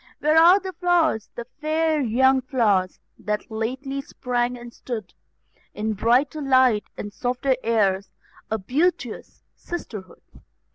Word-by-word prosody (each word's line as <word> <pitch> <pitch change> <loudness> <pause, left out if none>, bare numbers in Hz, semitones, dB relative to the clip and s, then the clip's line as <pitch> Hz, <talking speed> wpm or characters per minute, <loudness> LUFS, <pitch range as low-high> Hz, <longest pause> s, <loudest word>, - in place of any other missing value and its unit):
Where 305 +1 +2
are 345 +4 +7
the 380 -1 -7
flowers, 340 - +1
the 235 - -6
fair 310 +3 -1
young 260 +2 +3
flowers, 215 -9 +1 0.2
that 210 +1 -3
lately 260 +5 -3
sprang 250 -3 -2
and 240 0 -11
stood 220 -7 -6 0.6
In 215 +1 -2
brighter 250 +8 +1
light, 260 -6 +3
and 205 -1 -6
softer 250 +2 0
airs, 200 -4 +1 0.4
a 220 - 0
beauteous 290 - -2
sisterhood? 210 - -8
250 Hz, 125 wpm, -23 LUFS, 220-300 Hz, 0.6 s, are